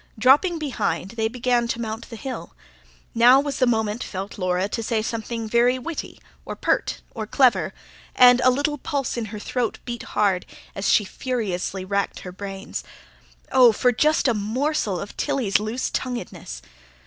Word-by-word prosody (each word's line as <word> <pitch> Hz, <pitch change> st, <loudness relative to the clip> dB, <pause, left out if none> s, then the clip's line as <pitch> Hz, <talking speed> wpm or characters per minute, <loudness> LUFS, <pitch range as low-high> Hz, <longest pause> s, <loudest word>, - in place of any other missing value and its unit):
Dropping 285 Hz, -, +4 dB
behind, 270 Hz, -, -2 dB
they 225 Hz, -1 st, -1 dB
began 245 Hz, 0 st, 0 dB
to 235 Hz, -, -2 dB
mount 225 Hz, 0 st, -5 dB
the 230 Hz, -, -7 dB
hill. 260 Hz, +3 st, -7 dB, 0.6 s
Now 245 Hz, +3 st, +7 dB
was 285 Hz, 0 st, -2 dB
the 255 Hz, -, +4 dB
moment, 220 Hz, -1 st, 0 dB
felt 195 Hz, +1 st, -6 dB
Laura, 185 Hz, +1 st, 0 dB
to 230 Hz, -, -3 dB
say 225 Hz, -1 st, -1 dB
something 230 Hz, 0 st, -4 dB
very 240 Hz, +3 st, +3 dB
witty, 310 Hz, +6 st, -6 dB, 0.2 s
or -, -, -6 dB
pert, -, -, 0 dB
or 220 Hz, -3 st, -5 dB
clever; 205 Hz, -, +3 dB, 0.4 s
and 250 Hz, 0 st, +7 dB
a 255 Hz, -, +7 dB
little 290 Hz, +3 st, 0 dB
pulse 275 Hz, -1 st, -2 dB
in 235 Hz, -2 st, -2 dB
her 215 Hz, 0 st, -7 dB
throat 235 Hz, +2 st, -2 dB
beat 240 Hz, -2 st, -5 dB, 0.2 s
hard, 200 Hz, -3 st, +2 dB, 0.3 s
as 195 Hz, -, -1 dB
she 210 Hz, -, +4 dB
furiously 195 Hz, -6 st, -3 dB
racked 200 Hz, +1 st, -1 dB
her 180 Hz, -, -7 dB
brains. 195 Hz, +1 st, -6 dB, 0.7 s
Oh, 255 Hz, -3 st, +7 dB
for 245 Hz, +3 st, +2 dB
just 300 Hz, +4 st, +2 dB
a 245 Hz, -, +3 dB
morsel 220 Hz, -, -1 dB
of 200 Hz, -, -7 dB
Tilly's 210 Hz, -7 st, +1 dB
loose 220 Hz, +4 st, -3 dB
tonguedness! 235 Hz, -, -5 dB
230 Hz, 165 wpm, -23 LUFS, 205-255 Hz, 0.7 s, Now